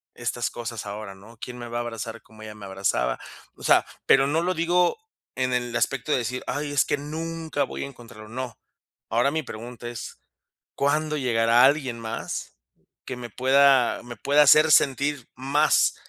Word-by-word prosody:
estas 120 0 -2
cosas 115 -2 -6
ahora", 100 -1 -7
¿no? 110 +4 -16
"¿Quién 125 +1 -7
me 120 -1 -7
va 120 - -3
a - - 0
abrazar 115 -1 -6
como 110 -1 -17
ella 105 -1 -9
me 105 -2 -10
abrazaba?" 95 -10 -1 0.4
O - - -14
sea, - - +5 0.2
pero 135 0 +5
no 155 +3 +1
lo 180 +2 0
digo 175 - +2 0.4
en 130 -1 0
el 120 -1 -1
aspecto 135 +4 -1
de - - +4
decir: 125 +1 -3
"Ay, 145 +1 -3
es 145 - +4
que 145 - -1
nunca 160 +1 -3
voy - - -5
a - - -4
encontrarlo", 115 -5 -13
no. 125 +1 -6 0.5
Ahora 120 +4 +2
mi 160 +1 -1
pregunta 120 0 -8
es, 120 -2 -8 0.6
¿cuándo 150 +2 0
llegará 120 -2 +3
alguien 135 -4 +2
más 115 0 -5 0.5
que 130 - -5
me 120 -1 -7
pueda 135 +1 +4
me 120 -1 -8
pueda 145 +1 +3
hacer 155 +1 +6
sentir 140 -1 +2
más 140 +4 +3
125 Hz, 180 wpm, -25 LUFS, 115-145 Hz, 0.6 s, hacer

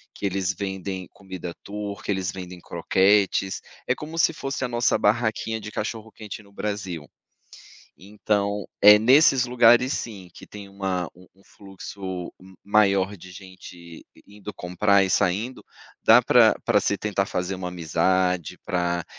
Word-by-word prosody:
que - - -6
eles 95 -1 -1
vendem 95 -1 -5
comida 95 -3 -8
Tur 100 0 -6
que - - -2
eles 95 -1 -2
vendem 90 -1 -9
croquetes, 95 +3 +1 0.3
é - - +1
como 155 +2 -8
se 165 - +3
fosse 135 -3 -4
a - - -2
nossa 120 0 +1
barraquinha 110 +1 0
de 110 - -8
cachorro-quente 110 -1 -6
no 100 - -21
Brasil, 95 -8 -5 0.9
então, 100 +1 -2 0.2
eh, 105 +1 +9
nesses 130 +2 +5
lugares 120 +1 +4
sim, 100 -6 -6
que - - -13
tem 100 -1 -11
uma 95 -3 -3
um 90 +1 -18
um 95 - -25
fluxo 95 -2 -8
m 95 +1 -16
maior 100 -1 +2
de 95 +1 -13
gente 95 -1 -12
i 85 -1 -13 0.2
indo 105 0 -10
comprar 95 +3 +2
e 95 - -2
saindo, 105 +7 0 0.4
dá - - +8
para - - +5
para - - +3
se 100 - 0
tentar 100 -2 -1
fazer 90 -1 -3
uma 90 -1 -5
amizade, 90 +1 0
para, 85 -1 -1
100 Hz, 155 wpm, -24 LUFS, 95-105 Hz, 0.9 s, eh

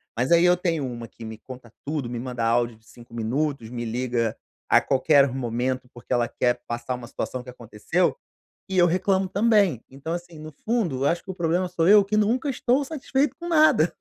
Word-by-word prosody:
mas 125 +5 -1
aí 170 0 +6
eu 180 0 +5
tenho 165 -6 -1
uma 120 -2 -6
que 115 - -14
me 110 0 -7
conta 125 -3 -12
tudo, 145 -4 -2
me 120 -1 -4
manda 125 -2 -4
áudio 120 0 +1
de 110 - -29
5 120 0 -16
minutos, 120 +1 -2
me 120 -1 -5
liga 120 -1 -1 0.3
a - - +6
qualquer 140 +1 +4
momento, 125 0 -2
porque 120 - -14
ela 120 -1 +2
quer 120 -1 0
passar 120 +2 -3
uma 120 -1 -9
situação 130 0 -4
que 125 - -12
aconteceu 120 +8 -1 0.5
e 190 -1 -1
eu 175 - +6
reclamo 190 +2 +1
também. 200 - +2
Então, 140 +5 -6
assim, 175 -2 -8
no 155 0 -9
fundo, 190 - 0
eu - - +3
acho 170 - -2
que 195 - -9
o - - -4
problema 175 +1 0
sou 165 -2 0
eu, 205 -1 +7
que 210 +2 -1
nunca 235 +7 +1
estou 255 +1 +1
satisfeito 275 -1 -1
com 345 - -6
nada. 305 - +4
140 Hz, 210 wpm, -24 LUFS, 120-185 Hz, 0.5 s, eu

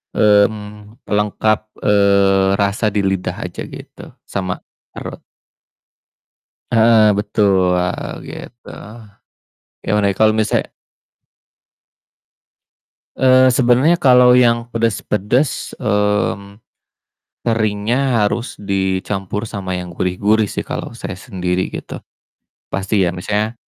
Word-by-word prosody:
mmm, 105 +2 +1
pelengkap, 105 +1 0 0.2
eee, 100 -1 +3
rasa 100 +2 0
di 105 - +1
lidah 95 -1 -1
aja - - -7
gitu, - - -12
sama 95 -2 -4 0.3
perut. - - -7 1.5
Heeh, 110 -2 +5
betul, 95 -4 +2
heeh, 90 0 -2 0.2
gitu. 120 0 -11 1.2
Gimana 105 -1 +1
ya 100 - -2
kalo 110 0 +5
misalnya 110 - -1 2.4
eee, 130 0 +5
sebenernya 130 +6 +3
kalo 125 -5 +5
yang 115 -1 +3
pedes-pedes, 115 +3 -1
mmm, 105 -1 -1 0.9
seringnya 115 +2 0
harus 115 +4 -3
dicampur 95 +1 -2
sama 95 -4 -5
yang 90 -1 -6
gurih-gurih 100 +5 0
sih - - -4
kalo - - -6
saya - - -6
sendiri 90 0 -3
gitu. - - -8 0.7
Pasti 100 +1 0
ya 85 - +1
misalnya, 105 +5 -3
105 Hz, 95 wpm, -18 LUFS, 95-115 Hz, 2.4 s, Heeh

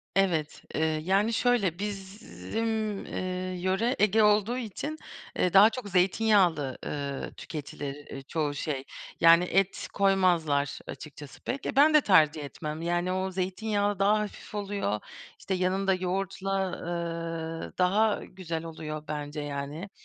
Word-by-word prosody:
Evet, 170 -6 +1
eee, 155 - 0 0.2
yani 200 +5 +2
şöyle, 215 -9 +2
bizim 210 +2 -3
eee, 185 0 -3
yöre 190 +8 +1
Ege 215 +1 +4
olduğu 210 +3 +3
için, 255 +6 -4 0.4
eee, 180 - +1
daha 200 +3 +9
çok 230 -3 -6
zeytinyağlı, 180 - +3
ııı, 140 -2 -4
tüketilir, 145 -2 -6
eee, 145 -2 -9
çoğu 145 +1 -2
şey. 140 -2 -3 0.4
Yani 165 +1 +7
et 195 +2 0
koymazlar, 175 -8 +2
açıkçası 145 -2 -9
pek. 265 +2 -4
E, - - -2
ben 295 +3 +6
de 305 - +7
tercih 160 - +4
etmem. 150 +2 -6
Yani 175 +1 0
o 185 0 -1
zeytinyağı 205 +2 -1
daha 205 +2 +4
hafif 210 0 -6
oluyor, 200 - -2 0.4
işte 195 - -3
yanında 190 +1 +1
yoğurtla, 190 +1 -1
eee, 165 -1 -4
daha 205 +4 +3
güzel 170 -4 -5
oluyor 155 -2 -6
bence 150 0 -4
yani. 145 +5 -5
185 Hz, 130 wpm, -28 LUFS, 160-205 Hz, 0.4 s, daha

